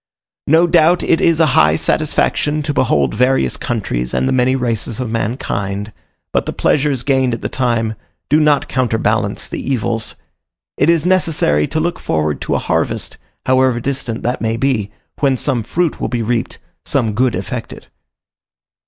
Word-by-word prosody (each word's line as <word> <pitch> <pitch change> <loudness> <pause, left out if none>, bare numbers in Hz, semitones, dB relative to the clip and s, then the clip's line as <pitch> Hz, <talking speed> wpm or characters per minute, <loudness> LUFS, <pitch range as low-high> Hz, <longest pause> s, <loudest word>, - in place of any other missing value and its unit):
No 160 +4 +5
doubt 170 0 +3
it 165 - +2
is 165 -1 +3
a 160 - +5
high 75 +1 +5
satisfaction 150 - +1
to 145 - -2
behold 70 - +1
various 125 - +2
countries - - -3
and - - +1
the 130 - +1
many 130 0 +2
races 120 -3 -2
of 125 -3 -3
mankind, 105 -3 -3 0.4
but - - 0
the - - -2
pleasures 140 -4 +1
gained 130 -3 +1
at 115 - -11
the - - -2
time 115 -4 0 0.3
do 150 +3 +3
not 150 -2 +3
counterbalance 120 -4 0
the - - -5
evils. 115 -4 -2 0.6
It 145 - +2
is 170 -1 +3
necessary 165 - +2
to 155 - -2
look 175 +2 -1
forward 75 -2 -1
to - - -1
a - - +3
harvest, - - -1 0.3
however 130 -2 +3
distant 125 -3 -3
that 125 +2 -1
may 115 0 -1
be, 115 -5 0 0.3
when 135 -3 +2
some 125 -2 0
fruit 170 +8 -1
will - - 0
be 120 -2 -2
reaped, 115 +1 -2 0.3
some 115 -6 0
good 125 +2 +1
effected. 100 +6 -6
125 Hz, 165 wpm, -17 LUFS, 110-145 Hz, 0.6 s, No